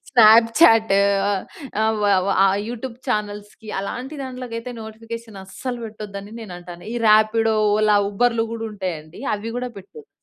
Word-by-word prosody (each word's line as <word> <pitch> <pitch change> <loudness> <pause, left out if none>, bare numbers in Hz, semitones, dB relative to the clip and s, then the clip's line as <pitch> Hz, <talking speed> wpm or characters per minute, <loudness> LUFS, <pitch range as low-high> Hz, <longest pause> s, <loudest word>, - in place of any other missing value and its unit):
Snapchat, 225 -1 +6 0.4
ఆహ్, 195 -2 -2 0.4
ఆహ్, 220 0 +2
వ - - +1 0.2
వ - - -1 0.2
ఆ - - +6 0.2
యూట్యూబ్ 240 0 -6
చానెల్స్‌కి 210 -1 -4
అలాంటి 250 +8 -5
దాంట్లోకి 255 -2 -7
అయితే 240 +2 -7
నోటిఫికేషన్ 225 0 -9
అస్సలు 245 +5 -6
పెట్టొద్దని 210 -1 -8
నేనంటాను. 175 -4 -10
ఈ - - -2
ర్యాపిడో, 220 +1 +4 0.2
ఓలా, 215 -1 +4
ఉబర్‌లు 230 +2 +1
గూడుంటాయండి. 190 -8 -6
అవి 210 +2 -5
గూడా 250 0 -3
పెట్టద్దు. 435 - -14
220 Hz, 135 wpm, -21 LUFS, 205-235 Hz, 0.4 s, Snapchat